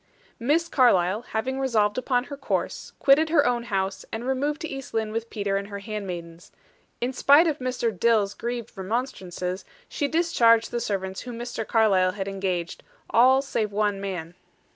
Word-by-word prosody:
Miss 300 +8 +1
Carlyle, 210 - +3
having 250 +3 -3
resolved 220 -6 +1
upon 250 -1 0
her 280 - -8
course, 270 -1 -3
quitted 300 +3 +4
her 300 -3 +4
own 240 -1 0
house, 195 -3 -2
and 225 +2 -4
removed 280 +3 -1
to 320 - -3
East 270 -4 -7
Lynne 220 -1 0
with 225 +1 -4
Peter 200 -2 -1
and 200 0 -4
her 200 -1 -6
handmaidens. 180 -5 -7 0.5
In 250 +2 -1
spite 285 +5 +6
of 310 -3 0
Mr. 250 -4 -1
Dill's 210 0 +2
grieved 235 -1 -5
remonstrances, 190 -4 -3 0.2
she 285 - -2
discharged 245 -9 +3
the 240 - -1
servants 190 -3 -3
whom 245 -2 -7
Mr. 235 -2 -5
Carlyle 195 -5 +3
had 195 -1 -4
engaged, 190 -3 -3 0.3
all 260 +3 +5
save 220 -6 -2
one 205 -1 0
man. 175 -4 -5
225 Hz, 165 wpm, -25 LUFS, 195-260 Hz, 0.5 s, spite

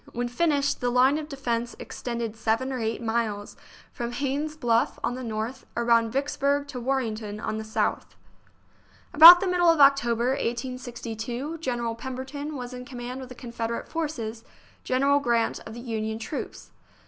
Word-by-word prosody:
When 245 +1 -2
finished, 285 +1 +1
the 245 - +1
line 260 +4 +4
of 305 0 -7
defence 240 -4 -2
extended 235 -2 -5
seven 225 +4 0
or 255 - -3
eight 225 +1 -2
miles, 220 -3 -2 0.4
from 240 0 -5
Haynes's 290 +3 -2
Bluff, 235 -4 +1
on - - 0
the 255 +1 -6
north, 225 +3 -4
around 230 -1 +3
Vicks 275 +3 -1
burg 280 +1 +1
to 260 -3 -5
Warrenton, 225 -5 -2
on 215 0 -3
the - - -4
south. 220 0 -2 1.0
About 335 +4 +11
the 390 - 0
middle 355 -1 +3
of 330 -2 +4
October, 250 -4 +4
1862, 245 +2 -4
General 240 -6 -2
Pemberton 260 +5 -6
was 250 -1 -6
in 250 0 -7
command 250 0 -7
of 255 - -9
the 255 - -10
Confederate 235 -1 -4
forces, 235 -9 -4 0.4
General 275 +2 +2
Grant 235 -4 0
of 220 - -8
the - - -7
Union 220 -2 -3
troops. 230 +6 -6
245 Hz, 160 wpm, -26 LUFS, 230-275 Hz, 1.0 s, About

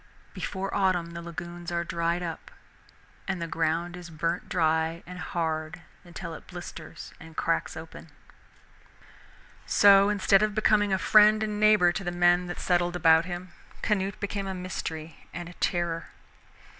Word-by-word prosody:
Before 195 0 -4
autumn 185 -4 +1
the 170 0 -7
lagoons 175 +1 -7
are 170 0 0
dried 170 +1 -1
up, 165 -2 -6 0.8
and 195 -2 -2
the 170 - -2
ground 165 +2 -1
is 175 -1 -9
burnt 165 +2 -3
dry 160 0 +1
and 180 0 -9
hard 160 -1 -3 0.2
until 170 -1 -8
it - - -11
blisters 170 -2 -9
and 165 -2 -13
cracks - - -1
open. - - -10 1.6
So 200 0 +6
instead 200 -1 +3
of 215 -1 0
becoming 215 -2 +3
a 190 - +3
friend 215 +3 +5
and 210 -1 -3
neighbor 210 -4 +5
to 195 - -4
the 175 - -2
men 175 0 +3
that 175 - -6
settled 175 -1 +1
about 165 -1 +5
him, 180 0 -6 0.3
Canute 200 -1 0
became 200 -1 -3
a 190 - -3
mystery 165 -4 -6
and 175 0 -5
a 175 - -10
terror. 170 -2 -1
175 Hz, 155 wpm, -27 LUFS, 170-195 Hz, 1.6 s, So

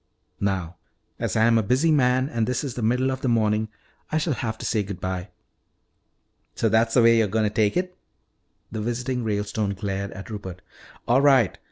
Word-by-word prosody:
Now, 95 -3 -2 0.4
as - - -2
I 110 - +3
am 115 -1 +4
a - - +2
busy 130 +10 +2
man 130 -2 +3
and 115 -5 -1
this 125 +3 -1
is 135 -4 -4
the 120 - -5
middle 125 +4 +1
of 130 0 -4
the - - -1
morning, 110 -2 +1 0.4
I 155 - +1
shall 155 0 0
have 110 -3 -3
to - - -7
say 110 - +1
good 100 -3 -6
bye 95 +1 -4 0.6
" - - -47
"So 115 - +1
that's 115 +1 +2
the 120 - +6
way 115 0 +6
you're 110 - +3
going 110 +2 +1
to 105 - -4
take 105 +4 +2
it?" 180 0 -2 0.8
The 110 - -4
visiting 125 +2 -2
Ralestone 105 -1 -2
glared 100 0 -3
at 100 +3 -9
Rupert. 95 -4 -7 0.4
"All 125 +3 +4
right. 135 - +4
110 Hz, 205 wpm, -24 LUFS, 105-125 Hz, 0.8 s, the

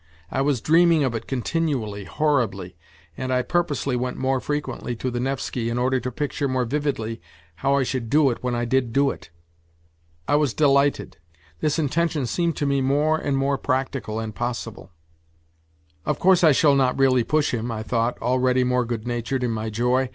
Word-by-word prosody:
I 135 - 0
was 135 -4 +1
dreaming 165 -1 +4
of 130 -3 0
it 115 0 -5
continually, 125 - -2
horribly, 110 - -1 0.4
and 130 +7 -4
I 125 0 +2
purposely 145 -6 0
went 125 +1 -2
more 130 0 0
frequently 145 -3 -3
to 125 +2 -3
the 120 - -3
Nevsky 125 -2 -2
in 120 - -2
order 130 +1 +1
to 125 - -4
picture 145 +2 -2
more 130 -1 0
vividly 120 - -2 0.4
how 135 +7 +1
I 140 - +2
should 125 -3 -3
do 145 -1 +4
it 120 - -6
when 125 -1 -1
I 120 0 -1
did 125 -1 0
do 140 +1 +3
it. - - -11 1.0
I 145 - +3
was 145 -6 0
delighted. 140 -1 +2 0.4
This 150 0 0
intention 160 -1 0
seemed 170 +7 -1
to 145 - -2
me 140 -1 +1
more 145 +4 +2
and 140 -3 -1
more 135 0 0
practical 130 -4 -2
and 110 -1 -5
possible. 115 -3 -5 0.6
" 80 0 -39
Of - - +1
course 185 -1 +4
I 160 - +7
shall 145 +1 +4
not 130 -2 +2
really 130 -3 +4
push 150 +2 +1
him," 120 0 -2
I 110 -1 -4
thought, 115 +1 -1
already 130 +1 +2
more 125 0 +1
good 115 -1 -4
natured 120 +2 -2
in 120 - 0
my 110 0 -3
joy. 125 +4 +1
130 Hz, 190 wpm, -23 LUFS, 120-140 Hz, 1.0 s, I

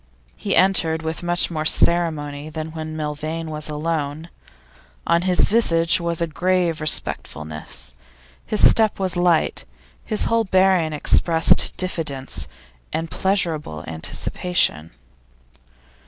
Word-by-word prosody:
He 200 - -2
entered 165 -4 +2
with 160 0 -4
much 175 0 +2
more 155 -2 -3
ceremony 155 -3 +1
than 155 0 -6
when 155 0 -7
Milvain 155 +2 -4
was 150 0 -4
alone; 155 0 -3 0.8
on 170 0 +2
his 180 0 +2
visage 170 -7 +3
was 170 -1 -2
a - - +1
grave 175 0 -1
respectfulness, 75 - -3 0.5
his 215 - +4
step 220 -2 +3
was 185 -2 -2
light, 175 -2 +1 0.4
his 215 - 0
whole 230 0 +1
bearing 185 -4 +2
expressed 160 +2 +2
diffidence 140 - -3 0.4
and 165 -1 -4
pleasurable 165 - -1
anticipation. 80 - 0
165 Hz, 110 wpm, -21 LUFS, 150-180 Hz, 0.8 s, his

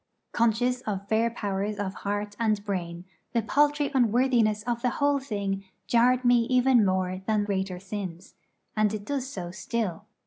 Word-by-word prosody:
Conscious 245 +2 +1
of 200 -1 -3
fair 225 +2 +2
powers 205 -2 -3
of 200 -2 -3
heart 205 +1 -3
and 215 -3 +1
brain, 175 -3 -4 0.3
the 230 -2 +1
paltry 290 +4 +2
unworthiness 235 -3 +3
of 240 0 -2
the 250 - +2
whole 285 0 +2
thing 200 -6 -3 0.2
jarred 250 +2 +3
me 245 -1 +5
even 255 -1 +4
more 185 -1 0
than 215 -2 +2
greater 190 -2 -2
sins; 190 -2 -6 0.4
and 215 -1 +2
it 205 -1 -7
does 275 -1 -2
so 180 -9 -6
still. 205 -1 -3
215 Hz, 160 wpm, -27 LUFS, 195-245 Hz, 0.4 s, me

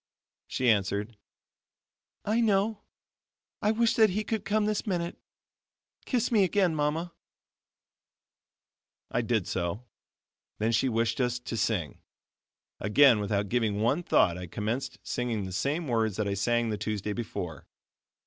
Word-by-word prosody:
She 130 - -1
answered: 105 0 +1 1.1
"I 220 +3 +2
know 205 -1 +3
it. 220 - -14 0.8
I 210 - +2
wish 225 +1 +3
that 220 -2 +6
He 210 +3 -2
would 215 -3 -1
come 210 +2 +1
this 215 +1 -1
minute. 175 -3 -2 0.9
Kiss 245 -3 0
me 215 -4 +5
again, 185 -2 +2
Mama." 155 +3 -1 2.0
I 120 - +1
did 110 -5 0
so; 95 +6 -3 0.7
then 110 +2 +1
she 125 +3 +2
wished 115 +1 0
us 125 -1 +1
to 125 - -5
sing. 105 -8 -1 0.8
Again, 120 +3 +5
without 100 0 -1
giving 110 -3 0
one 125 +10 +2
thought, 90 - +3
I 90 - -6
commenced 110 +9 -3
singing 115 -5 -2
the 95 - -6
same 140 - -1
words 110 -4 0
that 105 -2 0
I 100 - 0
sang 120 +4 +1
the 105 -1 -2
Tuesday 105 -1 -2
before. 90 -8 -5
120 Hz, 140 wpm, -28 LUFS, 105-175 Hz, 2.0 s, that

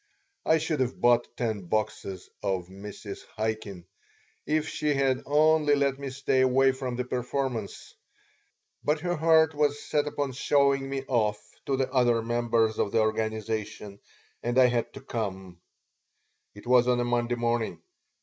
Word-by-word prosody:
I 160 - +5
should 155 -1 -2
have 130 0 -1
bought 120 0 +4
ten 110 -6 -2
boxes 100 -2 -3
of 95 -3 -2
Mrs. 100 +1 -9
Chaikin 110 -5 -3 0.6
if 155 +1 +1
she 150 -1 -1
had 135 -1 +1
only 150 0 +4
let 140 -1 0
me 140 -1 -4
stay 130 0 0
away 130 +1 +4
from 130 -2 -4
the 125 - -1
performance, 125 -3 -3 0.9
but 150 +1 +1
her 175 0 -1
heart 160 0 +4
was 145 -1 +1
set 150 0 -1
upon 145 -2 -2
showing 140 +1 +2
me 135 -1 -3
off 105 -5 +1 0.3
to 135 - +1
the 130 -1 -1
other 120 -3 +3
members 115 -1 +1
of 100 - 0
the - - +2
organization, 110 -2 -2 0.4
and 120 +1 -1
I 130 - +7
had 120 -1 -1
to - - -9
come 95 -6 -5 0.9
It 105 - -13
was 125 0 +4
on 125 -1 +3
a 120 - 0
Monday 120 0 0
evening. 120 -1 -1
125 Hz, 155 wpm, -27 LUFS, 110-140 Hz, 0.9 s, I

